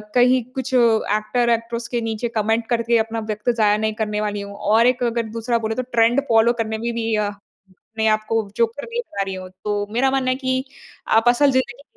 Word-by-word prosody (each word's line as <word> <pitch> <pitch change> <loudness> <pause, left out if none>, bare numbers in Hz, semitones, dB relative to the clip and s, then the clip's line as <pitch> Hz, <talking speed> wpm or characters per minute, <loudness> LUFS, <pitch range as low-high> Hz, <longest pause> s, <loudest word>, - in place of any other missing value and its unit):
कहीं 250 0 +4
कुछ 265 0 -4
actor, 230 0 +2
actress 230 0 -1
के 240 -1 -2
नीचे 225 +1 -2
कमेंट 220 +2 0
करके 235 0 +2
अपना 225 0 -1
वक़्त 210 +3 -2
ज़ाया 210 -2 +3
नहीं 215 0 -1
करने 210 -1 -2
वाली 205 -1 -2
हूँ। 200 0 -8
और 225 +4 +3
एक 250 0 +1
अगर 235 -1 0
दूसरा 235 +1 0
बोले 220 0 -1
तो 255 - -1
ट्रेंड 235 +3 +3
फॉलो 230 +1 +4
करने 220 0 -3
में 235 +2 -3
भी 225 -1 -1
अ, 210 -1 0 0.7
अपने 220 0 +1
आपको 215 +1 0
जो 230 - +4
कर 235 +6 -10
नहीं 470 +1 -2
पा 200 - -6
रही 195 0 -5
हूँ। 185 0 -8
तो 205 -1 -1
मेरा 265 +3 +2
मानना 265 -1 0
है - - 0
कि 260 -1 -1 0.5
आप 225 +2 +2
असल 275 +4 +4
ज़िंदगी 260 +1 -1
230 Hz, 215 wpm, -21 LUFS, 215-245 Hz, 0.7 s, कहीं